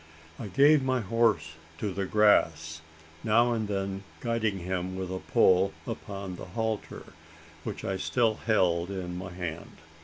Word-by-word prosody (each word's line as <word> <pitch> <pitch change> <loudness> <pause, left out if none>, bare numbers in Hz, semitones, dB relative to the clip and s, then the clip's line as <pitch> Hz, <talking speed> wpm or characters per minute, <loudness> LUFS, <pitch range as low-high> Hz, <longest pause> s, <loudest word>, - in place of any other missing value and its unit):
I 110 - -5
gave 145 +6 +5
my 130 -1 +1
horse 110 -5 +1 0.3
to 100 +1 -3
the 95 0 -2
grass 80 -7 +3 0.4
now 120 +2 +4
and 110 -2 -1
then 95 -1 -2 0.2
guiding 115 -4 0
him 90 0 -3
with 95 -1 -4
a 95 - -3
pull 95 +1 +3
upon 95 -2 -6
the - - -8
halter, 110 +3 -4 0.5
which - - -5
I 95 -1 -1
still 115 +3 +1
held 90 -5 +2
in 90 -2 -4
my 90 +1 -6
hand. 85 -2 -6
95 Hz, 150 wpm, -28 LUFS, 90-110 Hz, 0.5 s, gave